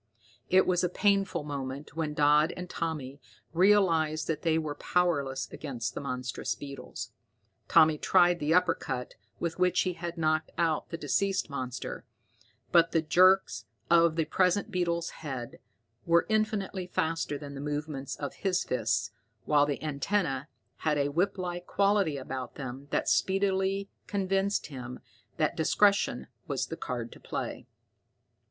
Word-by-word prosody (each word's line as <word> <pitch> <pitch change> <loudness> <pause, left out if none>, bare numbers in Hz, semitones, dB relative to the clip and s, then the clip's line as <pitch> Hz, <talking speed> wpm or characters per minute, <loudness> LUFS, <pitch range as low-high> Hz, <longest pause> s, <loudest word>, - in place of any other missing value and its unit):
It 190 +1 +5
was 180 -1 +2
a 180 - +2
painful 195 -3 +1
moment 140 0 -6
when 155 -2 -2
Dodd 150 +1 +4
and 180 0 -5
Tommy 150 -6 -4 0.3
realized 165 -5 +3
that 155 -2 -2
they 160 -1 +2
were 155 -2 -2
powerless 145 -6 0
against 125 -5 -4
the - - -5
monstrous 125 -2 -3
beetles. 140 -1 -8 0.6
Tommy 155 -1 +5
tried 175 -2 +4
the 150 +1 -1
uppercut 165 -8 +1 0.3
with 170 +1 -3
which 180 0 +3
he 185 - 0
had 170 0 -6
knocked 155 -1 +1
out 165 -2 0
the 165 - -4
deceased 185 +3 0
monster, 130 -2 -5 0.7
but 165 -1 +5
the 165 - +3
quick 155 - -26
jerks 185 -9 +4 0.3
of 170 -1 +5
the 165 -1 +1
present 185 +4 +1
beetle's 170 -2 -1
head 130 -6 -6 0.5
were 170 0 +4
infinitely 215 -4 0
faster 160 -4 -1
than 140 -1 -8
the 140 - -6
movements 145 -1 -4
of 145 - -5
his 185 -2 +1
fists, 115 -2 0 0.3
while 145 -1 +4
the 145 0 -3
antenna 150 -1 -1 0.3
had 155 -2 0
a 140 0 +1
whiplike 180 +1 -1
quality 200 -7 +2
about 130 -1 -6
them 135 +1 -7
that - - 0
speedily 195 0 +1 0.2
convinced 195 0 0
him 125 -3 -7 0.4
that 155 - +1
discretion 200 -4 +2 0.2
was 135 -3 -1
the 165 - -6
card 120 -6 -5
to - - -13
play. - - -5
160 Hz, 145 wpm, -29 LUFS, 140-180 Hz, 0.7 s, It